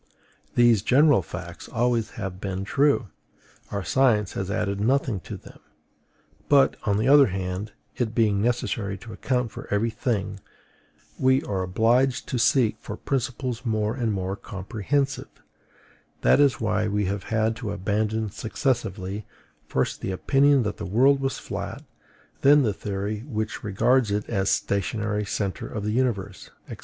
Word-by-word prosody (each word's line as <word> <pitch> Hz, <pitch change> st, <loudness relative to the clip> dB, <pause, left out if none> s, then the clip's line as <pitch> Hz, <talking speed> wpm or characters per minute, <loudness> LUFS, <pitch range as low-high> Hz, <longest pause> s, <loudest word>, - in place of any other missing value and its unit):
These 120 Hz, -4 st, +5 dB
general 140 Hz, +1 st, +5 dB
facts 85 Hz, 0 st, -8 dB
always 120 Hz, 0 st, 0 dB
have 95 Hz, -3 st, -5 dB
been 95 Hz, -1 st, -3 dB
true; 140 Hz, -2 st, +2 dB, 0.6 s
our 100 Hz, -1 st, -3 dB
science 110 Hz, +1 st, +2 dB
has 95 Hz, -1 st, -3 dB
added 100 Hz, -1 st, -1 dB
nothing 125 Hz, -2 st, +1 dB
to -, -, -8 dB
them. -, -, -15 dB, 0.9 s
But, 140 Hz, -2 st, +5 dB
on 100 Hz, -2 st, +2 dB
the 110 Hz, +4 st, +1 dB
other 140 Hz, 0 st, +7 dB
hand, 95 Hz, +2 st, -4 dB, 0.2 s
it 115 Hz, -2 st, -2 dB
being 105 Hz, -4 st, +2 dB
necessary 110 Hz, -4 st, -1 dB
to 110 Hz, +3 st, -10 dB
account 125 Hz, -4 st, -1 dB
for -, -, -9 dB
every 110 Hz, +3 st, +1 dB
thing, 105 Hz, -4 st, -2 dB, 0.8 s
we 130 Hz, +1 st, +3 dB
are 95 Hz, -2 st, -2 dB
obliged 115 Hz, +8 st, +2 dB
to 125 Hz, -, -1 dB
seek 120 Hz, -1 st, +3 dB
for 105 Hz, -, -7 dB
principles 125 Hz, -2 st, -2 dB
more 110 Hz, -2 st, 0 dB
and 120 Hz, -3 st, -1 dB
more 95 Hz, -1 st, -2 dB
comprehensive: 110 Hz, +9 st, -2 dB, 0.9 s
that -, -, +4 dB
is 140 Hz, -3 st, +4 dB
why 105 Hz, -1 st, 0 dB
we 105 Hz, 0 st, 0 dB
have 100 Hz, +1 st, -3 dB
had 110 Hz, 0 st, 0 dB
to 115 Hz, -4 st, -4 dB
abandon 105 Hz, +2 st, -1 dB
successively, 110 Hz, -5 st, -2 dB, 0.4 s
first -, -, -1 dB
the -, -, -3 dB
opinion 135 Hz, +8 st, +3 dB
that 105 Hz, -1 st, -3 dB
the -, -, -6 dB
world 130 Hz, +8 st, +4 dB
was 135 Hz, -3 st, -2 dB
flat, -, -, -6 dB, 0.6 s
then 145 Hz, +1 st, +6 dB
the 110 Hz, -4 st, +1 dB
theory 100 Hz, +2 st, -3 dB
which 110 Hz, -5 st, -3 dB
regards 115 Hz, +4 st, +2 dB
it 105 Hz, +1 st, -1 dB
as 95 Hz, 0 st, 0 dB
the -, -, +5 dB
stationary 105 Hz, +1 st, -1 dB
centre 100 Hz, -1 st, -3 dB
of 105 Hz, -, -5 dB
the 105 Hz, -, -1 dB
universe, 105 Hz, -, -1 dB, 0.2 s
&c. -, -, -8 dB
110 Hz, 155 wpm, -25 LUFS, 100-125 Hz, 0.9 s, other